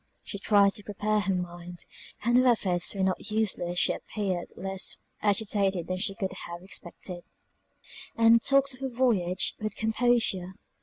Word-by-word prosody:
She 200 - -5
tried 200 -1 +4
to 210 - -10
prepare 210 +1 0
her 195 -1 0
mind, 175 0 -6 0.4
and 240 +2 +2
her 255 +1 +5
efforts 190 -7 +2
were 195 - 0
not 190 +2 -1
useless 205 -5 -1
she - - +3
appeared 190 -5 -3
less 190 0 -2 0.2
agitated 200 -3 +1
than 185 +1 -3
could 195 0 -2
have 170 - -7
been 175 - -16
expected, 180 -1 -5 0.9
and 230 0 +6
talked 275 +1 +3
of 255 - -13
her 270 -1 -2
voyage 215 -8 +1
with 215 0 -3
composure. 220 -5 +1
200 Hz, 155 wpm, -28 LUFS, 185-220 Hz, 0.9 s, and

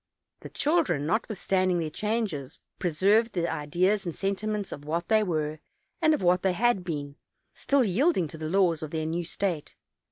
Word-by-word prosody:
The - - -9
children, 300 - +1
not 220 +10 0
withstanding 185 -3 +1
their 160 -2 -2
changes, 195 - -2 0.2
preserved 200 +7 +2
the 170 -2 0
ideas 175 +7 0
and 170 -3 -4
senti 200 +2 -2
ments 210 -2 -2
of 145 - -7
what 165 +3 -3
they 220 -1 +5
were, 155 -5 -1 0.4
and 315 -1 +5
of 195 - -5
what 180 +1 +4
they 190 -1 +2
had 225 -1 +2
been; 145 -4 -5 0.4
still 280 -2 +2
yielding 220 - +2
to 160 - -8
the 155 0 -3
laws 175 -3 +2
of 155 - -5
their 155 0 -2
new 165 +2 -2
state. 175 -2 -3
180 Hz, 185 wpm, -27 LUFS, 160-215 Hz, 0.4 s, they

